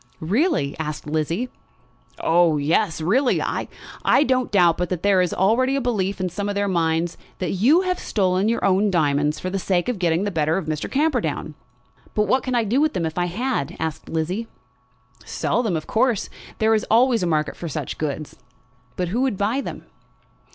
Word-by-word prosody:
"Really?" 205 - 0
asked 150 -1 -4
Lizzie. 160 +10 -1 0.7
"Oh, 165 -2 +3
yes; 160 +4 +1
really. 245 - +2
I - - -2 0.6
don't 255 -2 +1
doubt 175 -5 +4
but 180 - -1
that 180 -3 -3
there 200 -2 +4
is 180 - 0
already 245 +8 +2
a - - +1
belief 200 -7 -1
in 185 - 0
some 200 +4 -3
of 205 - -2
their 200 0 0
minds 165 -2 0 0.2
that 185 - -2
you 255 - +4
have 365 -1 -1
stolen 190 0 +1
your 230 - 0
own 195 +2 +3
diamonds 150 -4 +1
for 185 - -4
the 195 - -1
sake 180 -2 0
of 240 -6 -2
getting 170 0 +1
the 205 - -1
better 160 -1 +1
of 190 - -3
Mr. 155 -1 -3
Camperdown." 255 - 0 0.6
"But 210 - +3
what 255 +6 +2
could 255 -1 -2
I 235 - +3
do 235 +7 +1
with 310 0 +2
them 170 - -1
if 160 +2 -3
I 175 - +1
had?" 205 - -2
asked 160 -1 -4
Lizzie. 180 +8 -2 0.8
"Sell 235 - -1
them, 205 -9 0
of 155 - -6
course. 235 -2 0 0.3
There 220 0 +3
is 215 - +2
always 240 0 +4
a 180 - 0
market 155 -2 0
for 170 - -6
such - - -5
goods." 155 0 -4 0.6
"But 180 -2 -2
who 230 +7 0
would 260 -7 0
buy 220 +8 0
them?" - - -7
190 Hz, 195 wpm, -22 LUFS, 160-230 Hz, 0.8 s, doubt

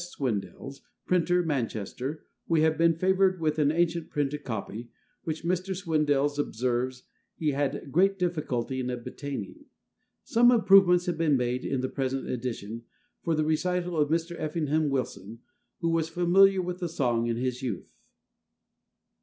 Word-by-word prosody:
Swindells, 135 - -4 0.2
printer, 180 0 +2
Manchester, 130 - -3 0.2
we 165 -2 +3
have 160 0 +3
been 165 0 +3
favoured 185 +1 +2
with 155 -1 0
an 145 -1 +3
ancient 170 0 0
printed 145 0 -2
copy, 115 0 -5 0.4
which 160 0 -4
Mr. 185 +2 -1
Swindells 145 -5 +1
observes 125 0 -1 0.3
he 155 -2 0
had 140 0 -2
great 195 +5 +3
difficulty 150 -8 -2
in 125 -1 -2
obtaining. 125 -3 -6 0.6
Some 240 +1 +4
improvements 195 -6 +6
have 175 -2 -2
been 155 -4 +3
made 125 0 -1
in 135 -2 -1
the 130 - -1
present 135 0 -3
edition 115 -3 -4 0.4
from 165 -2 +1
the 155 - +1
recital 180 +3 0
of 150 -2 +2
Mr. 165 +2 -1
Effingham 155 -1 0
Wilson, 115 -4 -4 0.4
who 165 - +1
was 165 -1 0
familiar 185 +3 +4
with 180 0 -4
the 175 -2 -3
song 120 -7 0
in 115 -1 -1
his 125 +1 -2
youth. 115 -9 -5
150 Hz, 145 wpm, -28 LUFS, 130-175 Hz, 0.6 s, improvements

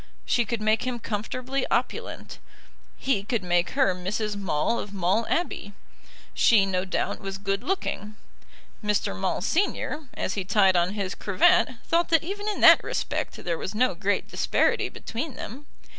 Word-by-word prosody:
She 240 - +2
could 230 0 -3
make 215 +1 +2
him 250 -1 -2
comfortably 250 +5 -3
opulent. - - -2 0.6
He 265 -7 0
could 220 -1 -1
make 175 0 +1
her 265 -9 +4
Mrs. 205 +4 -3
Maule 195 +3 0
of 205 0 -6
Maule 195 +5 +1
Abbey. 320 - -2 0.6
She, 215 -4 +5
no 185 -1 -1
doubt, 185 - -2
was 195 0 -5
good 195 0 -2
looking. 215 - -3 0.7
Mr. 210 - 0
Maule, 95 - -1
Senior, 315 - -1
as 190 - -2
he 195 - -2
tied 195 -1 +4
on 175 +2 +2
his 195 -3 -2
cravat, 290 - +3
thought 335 +1 +2
that 325 -1 +4
even 405 +4 -5
in 420 - -3
that - - +8
respect - - -3
there 170 -2 -2
was 195 - -5
no 250 +1 +2
great 200 +3 -1
disparity - - +1
between 255 +3 -5
them. 280 +6 -8
210 Hz, 160 wpm, -26 LUFS, 195-255 Hz, 0.7 s, that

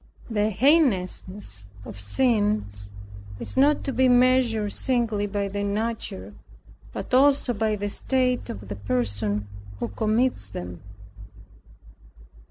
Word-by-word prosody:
The 210 -1 +2
heinousness 200 - +1 0.2
of 100 - -8
sins 205 - 0 0.5
is - - -4
not 285 +3 +4
to 275 - -2
be 255 +1 +4
measured 245 -4 +3
singly 230 -5 0
by 200 0 -2
their 200 +1 -3
nature, 200 - -3 0.6
but - - -6
also 275 -1 +4
by 215 0 0
the 205 0 -3
state 250 +4 0
of 100 -1 -7
the 100 - -5
person 105 -1 -1 0.3
who 120 - -3
commits 215 - 0
them. 90 -3 -7
210 Hz, 115 wpm, -25 LUFS, -, 0.6 s, not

